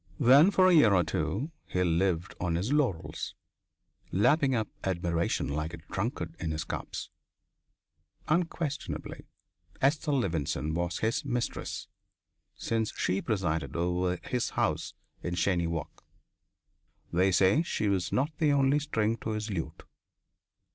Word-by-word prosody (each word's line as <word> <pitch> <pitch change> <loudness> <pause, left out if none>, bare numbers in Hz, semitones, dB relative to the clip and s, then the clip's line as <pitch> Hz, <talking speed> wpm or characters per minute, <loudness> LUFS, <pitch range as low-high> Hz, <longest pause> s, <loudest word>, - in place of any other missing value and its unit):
Then 140 +6 +7
for 190 -2 +4
a 185 - +5
year 115 -11 +6
or 90 - +4
two 90 - -2 0.2
he 90 - 0
lived 90 +2 +1
on 85 -2 0
his 100 +11 0
laurels, 130 - -1 0.8
lapping 135 - +3
up 110 -2 0 0.2
admiration 85 -2 0
like 80 +3 -3
a 80 - -15
drunkard 95 -5 -3
in 80 - -2
his 80 0 -2
cups. - - -5 1.2
Unquestionably, 165 -2 -2 0.5
Esther 150 +3 +2
Levenson 80 - -1
was 85 +1 -1
his 110 +1 0
mistress, 120 -1 -3 0.7
since 110 -1 -1
she 95 +2 0
presided 90 -7 -1
over 90 +1 0
his 125 -2 -1
house - - 0 0.3
in 85 0 -3
Cheyne 85 0 +1
Walk. 80 -3 -5 1.1
They 95 +3 +3
say 95 - +4
she 140 -10 -1
was 95 -3 0
not 140 +5 +1
the 155 -3 +3
only 140 +1 +3
string 115 -6 0
to 110 - -4
his 110 0 -3
lute. 85 -5 -4
95 Hz, 135 wpm, -29 LUFS, 85-130 Hz, 1.2 s, Then